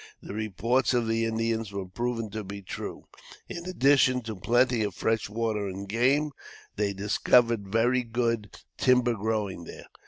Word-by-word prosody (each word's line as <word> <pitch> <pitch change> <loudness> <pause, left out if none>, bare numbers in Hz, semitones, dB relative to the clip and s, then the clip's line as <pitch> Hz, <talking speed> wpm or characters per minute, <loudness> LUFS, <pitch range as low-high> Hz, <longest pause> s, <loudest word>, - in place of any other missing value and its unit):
The - - -9
reports 110 +5 +1
of 120 -2 +1
the 115 0 +1
Indians 115 -1 -1
were 100 -1 -4
proven 115 +3 -3
to 110 +1 -4
be 100 +1 -8
true. - - -6 0.4
In 170 +1 -7
addition 135 -6 +3
to 110 -1 -5
plenty 120 +4 +2
of 100 -4 -2
fresh 110 -2 0
water 110 -2 -1
and 95 +1 -6
game, 130 +8 +2 0.4
they 105 -1 0
discovered 105 +2 +2
very 120 +5 +2
good 115 -2 -1 0.3
timber 125 -1 +4
growing 105 -5 -2
there. - - -10
115 Hz, 155 wpm, -27 LUFS, 105-120 Hz, 0.4 s, timber